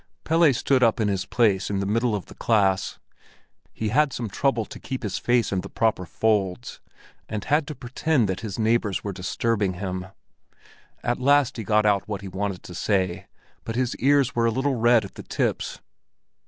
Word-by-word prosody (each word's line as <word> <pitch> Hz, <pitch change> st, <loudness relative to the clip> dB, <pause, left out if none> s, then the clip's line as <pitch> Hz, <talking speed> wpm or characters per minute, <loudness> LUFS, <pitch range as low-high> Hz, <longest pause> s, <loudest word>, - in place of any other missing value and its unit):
Pelle 165 Hz, -1 st, +4 dB
stood 130 Hz, +1 st, +1 dB
up 115 Hz, -2 st, +3 dB
in 105 Hz, -2 st, +1 dB
his 95 Hz, -1 st, -2 dB
place 100 Hz, -5 st, +2 dB
in 100 Hz, -1 st, -1 dB
the 100 Hz, -, -1 dB
middle 115 Hz, +2 st, +1 dB
of 100 Hz, -, -5 dB
the -, -, -13 dB
class. 100 Hz, -4 st, +1 dB, 0.7 s
He 110 Hz, -, -3 dB
had 145 Hz, +5 st, +3 dB
some 120 Hz, -3 st, -4 dB
trouble 120 Hz, +1 st, 0 dB
to -, -, -10 dB
keep 130 Hz, -2 st, -5 dB
his 100 Hz, -3 st, -2 dB
face 120 Hz, -2 st, +1 dB
in 95 Hz, -2 st, 0 dB
the -, -, -9 dB
proper 110 Hz, -5 st, 0 dB
folds, 105 Hz, +2 st, -1 dB, 0.5 s
and 110 Hz, -2 st, -3 dB
had 145 Hz, +2 st, +2 dB
to 150 Hz, -, -6 dB
pretend 130 Hz, 0 st, 0 dB
that 95 Hz, -1 st, -2 dB
his 105 Hz, -4 st, -5 dB
neighbors 110 Hz, -3 st, +1 dB
were 100 Hz, -, -3 dB
disturbing 100 Hz, +2 st, -1 dB
him. 95 Hz, 0 st, -4 dB, 1.0 s
At 120 Hz, 0 st, 0 dB
last 140 Hz, 0 st, +3 dB
he 115 Hz, -, -4 dB
got 105 Hz, +1 st, +2 dB
out 100 Hz, -2 st, +2 dB
what 100 Hz, -2 st, -4 dB
he 100 Hz, -, -7 dB
wanted 95 Hz, 0 st, -4 dB
to 90 Hz, -, -10 dB
say, 95 Hz, -1 st, -1 dB, 0.4 s
but 115 Hz, -, -5 dB
his 125 Hz, -1 st, 0 dB
ears 140 Hz, 0 st, +3 dB
were 115 Hz, -1 st, +2 dB
a -, -, +2 dB
little 135 Hz, +4 st, 0 dB
red 120 Hz, -2 st, +4 dB
at 100 Hz, -, -11 dB
the -, -, -9 dB
tips. -, -, -2 dB
110 Hz, 195 wpm, -24 LUFS, 100-125 Hz, 1.0 s, Pelle